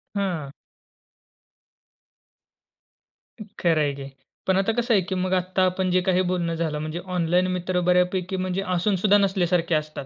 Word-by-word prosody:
हं. 175 -8 -2 2.9
अ, - - -4 0.2
खरं 165 -3 +2
आहे 145 -1 0
की. 140 - -8 0.4
पण 190 0 +3
आता 195 +3 +2
कसं 240 +1 0
आहे 200 - +4
की 190 - -1
मग 185 0 -1
आत्ता 185 +1 +1
आपण 185 0 0
जे 185 0 +3
काही 185 0 +2
बोलणं 170 -2 -1
झालं 160 -2 -2
म्हणजे 155 +2 -4 0.2
ऑनलाईन 175 +1 +2
मित्र 180 0 -1
बऱ्यापैकी 180 +1 +1 0.4
असूनसुद्धा 200 +2 +3
नसल्यासारखे 180 -4 +1
असतात. 155 -2 -4
180 Hz, 145 wpm, -24 LUFS, 170-190 Hz, 2.9 s, आहे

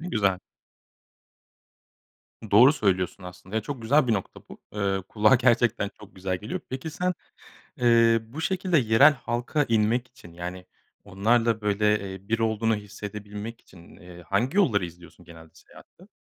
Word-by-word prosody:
Ne 175 - -6
güzel. 100 -4 +1 2.1
Doğru 125 +8 +7
söylüyorsun 95 -6 -1
aslında 90 +3 -11
ya, 110 - 0
çok 130 -2 -6
güzel 135 +4 +3
bir 115 - +1
nokta 95 -3 -4
bu, - - -12
eee, 100 -2 -1
kulağa 110 +3 +4
gerçekten 120 -4 +2
çok 105 - -14
güzel 95 -1 -2
geliyor. 105 +4 -6
Peki, 130 +5 -5
sen, 180 +3 -2 0.6
eee, 115 -1 +4
bu 125 +8 -9
şekilde 185 -1 0
yerel 130 +5 +5
halka 125 +4 -2
inmek 115 +3 +1
için, 85 -9 -16
yani 90 +1 -7 0.4
onlarla 115 +3 +1
böyle, 105 -1 0
eee, 95 +1 -12
bir 115 - +1
olduğunu 110 0 +1
hissedebilmek 105 +2 -8
için, 85 -2 -17
ııı, 90 -1 -13
hangi 120 - -1
yolları 105 - +3
izliyorsun 85 0 -14
genelde 80 -1 -14
seyahatte? - - -19
110 Hz, 150 wpm, -25 LUFS, 95-120 Hz, 2.1 s, Doğru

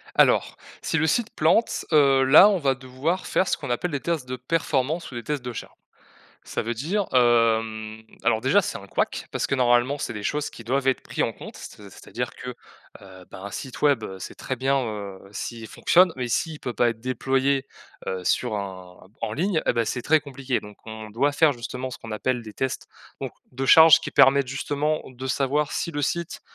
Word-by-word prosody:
Alors, - - +3 0.3
si 160 - -1
le 160 - +2
site 225 +8 +1
plante 165 +9 +2
heu, 140 -3 +5
là 155 +10 +8
on 200 - +2
va 135 -4 +1
devoir 135 +8 -3
faire 190 - +1
ce - - +1
qu'on 140 -5 -7
appelle 120 +9 -1
des 145 -3 -2
tests 165 -5 -2
de 130 - -3
performance 150 +3 -1
ou - - -11
des 120 - -5
tests 145 -1 -3
de 125 - -4
charge. 115 - -8 0.7
Ça - - -3
veut 115 +2 -2
dire, 180 - -1
hem, 115 -3 +2 0.2
alors 110 - +2
déjà 180 - +3
c'est - - -4
un 100 - -12
couac - - -2
parce - - -1
que - - -1
normalement 125 +2 +3
c'est - - -3
des 105 - -6
choses 150 +7 -1
qui 115 - -12
doivent 135 +3 0
être 130 - +1
pris - - -2
en - - 0
compte - - -11
c'est - - -11
c'est-à-dire - - -5
que, - - -7 0.5
heu, 95 -2 -13
ben, - - -10
un 100 - -6
site 130 +3 -7
web 145 -2 +3
c'est - - -8
très 130 - -4
bien, 135 +2 +1
heu, 100 -3 -6
s'il 115 +1 -6
fonctionne 180 - +4
mais 125 -1 -3
s'il 155 +6 -1
peut 125 - -4
pas 120 0 +2
être 115 -1 -8
déployé, 135 +2 0 0.4
heu, 95 -1 -3
sur 120 +3 0
un 95 -2 -7 0.2
en 110 -2 -2
ligne, 170 - 0
et - - +4
beh 115 -1 +1
c'est 125 +3 -3
très 155 +3 +4
compliqué. 135 -3 -3
Donc 105 0 -12
on 110 -1 -8
doit 140 +7 +1
faire 150 +1 +4
justement 125 +1 -6
ce - - -8
qu'on 115 -1 -8
appelle 120 +3 -1
des 110 -2 -10
tests 130 +3 -3 0.3
donc - - -4 0.2
de 135 +2 -3
charge 160 +3 +8
qui - - -5
permettent 135 -1 +5
justement 145 +3 -1
de 130 0 -8
savoir, 140 +3 0
si - - -2
le 145 -2 -3
site 170 +4 -2
130 Hz, 215 wpm, -24 LUFS, 115-150 Hz, 0.7 s, là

